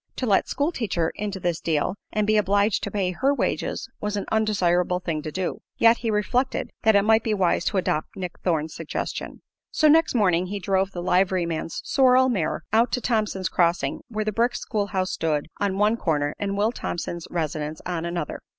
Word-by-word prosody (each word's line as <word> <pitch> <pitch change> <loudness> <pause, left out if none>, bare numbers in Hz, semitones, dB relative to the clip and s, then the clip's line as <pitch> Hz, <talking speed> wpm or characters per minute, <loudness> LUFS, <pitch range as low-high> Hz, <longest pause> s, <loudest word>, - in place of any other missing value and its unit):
To 255 - -2
let 200 -5 +2
"school 290 +4 0
teacher" 180 - -1
into 205 -2 -4
this 175 -2 -1
deal 160 +3 0 0.2
and 215 -1 0
be 215 +1 +2
obliged 205 0 +2
to - - -3
pay 195 -2 -1
her 265 +10 +1
wages - - -2
was 210 0 -2
an 200 - -3
undesirable 180 -5 +2
thing 165 -4 -3
to 155 - -6
do; 185 +2 -3 0.2
yet 230 0 +5
he 230 - -2
reflected 245 +5 0
that 220 -2 +4
it 200 - +5
might 220 +1 +4
be 220 -2 0
wise 180 -2 +1
to 205 - 0
adopt 155 -4 -1
Nick 180 -2 -5
Thorne's 160 -3 0
suggestion. 165 -2 -5 0.3
So 310 - +3
next 315 -1 +4
morning 185 -5 +2
he 205 +2 -4
drove 190 +1 0
the 175 -2 -5
liveryman's 180 -3 0
sorrel 260 -1 +4
mare 190 -10 -1
out 230 +2 +4
to - - +1
Thompson's 215 -6 0
Crossing, 170 -5 +1
where 215 -2 -3
the 215 - 0
brick 235 +3 +1
school 205 -2 -2
house 190 -2 -1
stood 150 -3 -1
on 195 -1 0
one 210 +3 +3
corner 145 -6 0
and 200 -1 -2
Will 215 +3 +2
Thompson's 170 -6 -5
residence 155 -2 -3
on 175 -2 -2
another. 170 -3 -3
195 Hz, 195 wpm, -24 LUFS, 170-215 Hz, 0.3 s, yet